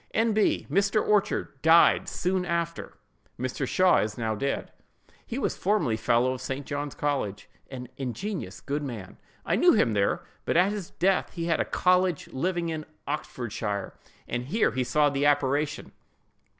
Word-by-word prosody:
"N. 225 0 +3
B.—Mr. 200 -1 +2
Orchard 200 -9 0
died 165 +2 +5
soon 185 +1 -1
after. 170 -1 -3 0.4
Mr. 130 +2 -2
Shaw 185 +5 +4
is 105 0 -2
now 110 -2 -1
dead: 140 +6 -2 0.6
he 240 - -4
was 275 - -1
formerly 185 - +1
fellow 120 +3 +2
of 130 - -7
St. 135 +1 -4
John's 145 0 -4
college—an 125 -1 -4
ingenious, 135 - -4
good 145 +2 -2
man. 115 -10 -7 0.3
I - - +1
knew - - +6
him 115 - +3
there; 100 -1 +1 0.2
but - - 0
at 185 +3 +4
his 205 -4 -5
death 190 +1 +1
he 170 -1 -3
had 165 -2 +1
a - - +1
college 180 -3 +2
living 170 +4 -1
in 155 -2 -4 0.2
Oxfordshire, 110 -8 -4 0.3
and 120 0 -3
here 215 - +2
he 130 +3 -1
saw 145 +3 +2
the 140 +1 +1
apparition." 145 +1 0
145 Hz, 155 wpm, -27 LUFS, 125-180 Hz, 0.6 s, knew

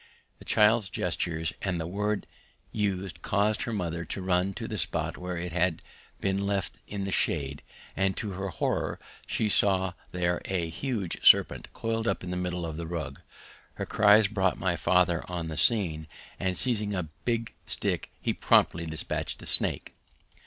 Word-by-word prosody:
The - - -13
child's 105 -1 +4
gestures 80 -1 -2
and 90 -3 -1
the 80 - -3
word 105 +4 -1
it - - -23 0.5
used 100 -3 -2
caused 105 +2 +1
her 120 - -3
mother 85 -5 -2
to 90 - -5
run 90 +1 +1
to - - -5
the - - -4
spot - - -1
where 90 -1 -5
it 90 +1 -4
had 90 -1 0 0.4
been 100 0 0
left 100 -2 -2
in 100 -1 -4
the 95 - -3
shade, 70 -6 0 0.3
and 95 -1 +1
to 105 -4 -3
her 95 +1 -4
horror 95 - -1 0.3
she 110 - 0
saw 95 -3 +3 0.2
there 90 -1 0
a 85 -4 -2
huge 110 -4 -3
serpent - - +5
coiled 115 0 -2
up - - 0
in 90 - -5
the - - -2
middle 90 -1 -2
of 80 -2 -5
the 85 -1 -5
rug. 80 -5 -5 0.5
Her - - -3
cries 105 0 +5
brought 95 -3 +1
my 95 -2 0
father 85 -1 +2
on 85 -2 -4
the 80 - -5
scene, 80 -5 +3 0.3
and 95 -1 0
seizing 105 -5 0
a 85 -5 -3
big 115 -1 -1
stick - - -1
he - - -1
promptly 85 0 +3
dispatched 80 0 -2
the - - -11
snake. - - +4
95 Hz, 175 wpm, -28 LUFS, 85-105 Hz, 0.5 s, serpent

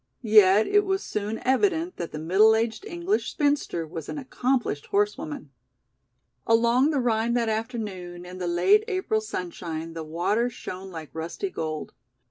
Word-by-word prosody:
Yet 210 -1 +6
it 410 0 +3
was 385 0 -1
soon 210 +1 -3
evident 330 +6 +1
that 170 - -5
the - - -6
middle 190 +8 +5
aged 225 - -1
English 380 +2 -1
spinster 285 - 0
was 160 -1 -7
an - - -4
accomplished 255 - -1
horsewoman. 200 -8 -1 1.0
Along 235 +5 +4
the 295 -3 +1
Rhine 235 -1 +1
that 235 -2 +1
afternoon 210 -6 -4
in 180 +1 -9
the 180 - -2
late 390 - +4
April 370 - 0
sunshine 170 -5 -5
the 165 -1 -5
water 180 +10 0
shone 190 -4 -8
like 160 -4 -8
rusty 165 - -4
gold. 155 - -4
220 Hz, 150 wpm, -26 LUFS, 175-260 Hz, 1.0 s, Yet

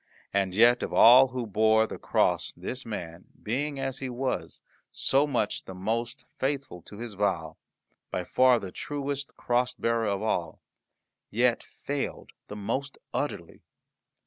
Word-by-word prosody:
And 95 -2 0
yet 120 +3 +6
of - - -3
all 125 +3 +8
who 125 -1 -4
bore 110 +1 +3
the - - -8
cross - - +1
this 130 -1 -6
man, 85 -5 -6 0.2
being, 140 +6 -2
as 135 -1 -3
he 135 - -4
was, 125 +1 -3 0.3
so 140 +2 +2
much 120 -7 -1
the 95 - -8
most 115 +5 -3
faithful 135 -9 -2
to 100 - -11
his 115 -1 -6
vow, 95 -6 -1 0.5
by - - -2
far 130 -1 +4
the 95 -5 -6
truest 140 +1 -4
cross 125 +1 0
bearer 115 -2 0
of 100 0 -1
all, 90 -6 -1 0.7
yet 120 +1 +2
failed 140 -1 -5 0.2
the 105 - -7
most 125 +7 -3 0.2
utterly. - - -4
120 Hz, 145 wpm, -28 LUFS, 105-130 Hz, 0.7 s, all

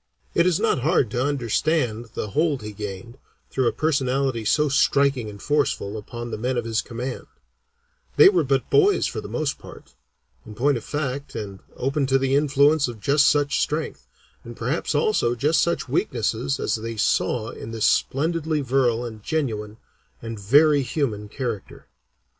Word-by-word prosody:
It 170 +1 +3
is 175 -3 +2
not - - +1
hard 135 -4 +1
to 120 +2 0
understand 125 -2 0
the 105 - -3
hold 150 -4 0
he 105 - -6
gained, 105 +4 -8 0.3
through 130 -2 +1
a - - +3
personality 135 -5 0
so 150 +8 +2
striking 140 -4 +2
and 100 -1 -10
forceful, 140 -7 -1
upon 120 +2 -7
the 110 - -4
men 125 +2 -1
of 120 - -2
his 115 -1 0
command; 125 +2 -6 0.9
they - - +8
were 180 -5 +4
but 135 -1 -1
boys 410 -1 +4
for - - -3
the - - -8
most 155 -3 -2
part, - - -13 0.5
in 110 - -11
point 140 +5 +2
of 115 - -5
fact, 140 -1 -4
and 100 -3 -6 0.2
open 135 +1 -1
to 135 0 +3
the 135 0 +1
influence 145 0 +3
of 120 -3 -7
just 140 +5 +3
such 145 0 +2
strength, 155 +1 -3 0.4
and 120 0 -10
perhaps 140 +6 -2
also 145 - +2
just 150 +6 +2
such 170 - 0
weaknesses, 70 -1 -1
as - - 0
they 115 +1 -6
saw 110 +2 0
in - - -9
this 110 -1 -1
splendidly 155 +4 +1
virile 125 -3 +1
and 110 -2 -8
genuine, 110 -7 -3 0.4
and 115 -2 -7
very 145 +8 +4
human 120 -6 -2
character. 115 -5 -5
130 Hz, 170 wpm, -23 LUFS, 115-145 Hz, 0.9 s, they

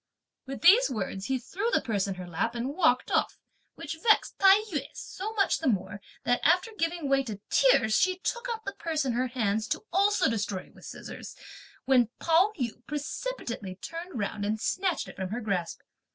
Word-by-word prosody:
With 270 0 -6
these 395 +7 +7
words, 195 -5 -4
he 265 - +1
threw 370 - -3
the - - +3
purse 205 -4 -1
in 195 - -3
her 180 0 -7
lap 200 +8 -2
and 245 +4 -3
walked 295 -7 +2
off; - - +1 0.4
which 320 -1 -6
vexed 435 +1 +3
Tai 390 0 +8 0.2
yü 295 - 0
so 410 +3 -6
much 400 -3 +2
the 320 - -2
more 200 -3 -1 0.2
that, 245 +1 +1
after 360 +8 +3
giving 330 -4 -1
way 275 0 +3
to 220 -7 -6
tears, - - +4
she 370 +9 +3
took 475 +6 -3
up 450 -2 -4
the 395 - -3
purse 315 -4 -2
in 255 - 0
her 250 +2 0
hands 220 -3 -1
to - - -2
also 400 0 +3
destroy 205 -5 -2
it - - -20
with - - -15
the - - -10
scissors, - - -8 0.5
when 250 -4 +4
Pao 340 +5 +3
yü 240 -3 -4
precipitately 285 - -4
turned 330 - -7
round 205 -1 -3
and 215 +2 -1
snatched 370 - -1
it - - -11
from 190 -1 -3
her 225 +5 -3
grasp. 195 -7 -2
265 Hz, 200 wpm, -28 LUFS, -, 0.5 s, Tai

